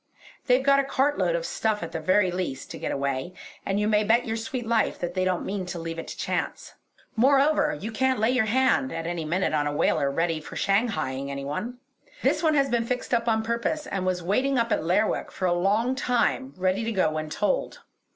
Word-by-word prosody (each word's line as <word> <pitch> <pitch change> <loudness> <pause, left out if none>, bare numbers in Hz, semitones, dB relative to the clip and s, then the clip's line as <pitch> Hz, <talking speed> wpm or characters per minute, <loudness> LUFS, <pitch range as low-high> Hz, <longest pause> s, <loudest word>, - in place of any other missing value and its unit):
They've 255 +1 +4
got 275 0 +5
a - - +3
cartload 285 - +1
of - - -2
stuff 220 - -1
at 165 - -6
the - - -3
very 185 +3 +2
least 175 -7 -4
to - - -7
get - - -3
away; 140 +5 -2 0.3
and 195 +1 -1
you 210 - +1
may 215 0 +3
bet 230 +3 +3
your 225 - -2
sweet 240 +2 -4
life 225 -1 +1
that 175 0 -4
they 185 0 0
don't 185 -1 0
mean 190 -2 -3
to 180 - -5
leave 165 0 -5
it - - -7
to - - -7
chance. - - -3 0.4
Moreover, 285 +4 +3
you 220 - -5
can't 260 +3 +1
lay 220 +3 +3
your 250 -4 +2
hand 260 +3 +2
at 165 0 -4
any 170 -1 -3
minute 175 +3 0
on 145 -1 +1
a - - -1
whaler 145 -1 +1
ready 165 +2 -1
for - - -10
shanghaieing 195 - 0
any 140 0 -5
one. 200 - -4 0.5
This 305 +4 +2
one 315 -2 +3
has 275 -1 +3
been 235 -2 0
fixed 250 0 -3
up 235 0 +1
on 220 -1 +2
purpose, 235 +7 -1
and 195 -2 -3
was 185 -1 -1
waiting 255 +9 +1
up 230 -1 +1
at - - +1
Lerwick 190 +6 +1
for 185 - -3
a 175 - +3
long 205 +8 +1
time 260 +1 0
ready 185 +4 0
to 230 - -1
go 190 -6 +2
when 155 0 -4
told. 205 +6 -1
210 Hz, 230 wpm, -26 LUFS, 175-250 Hz, 0.5 s, got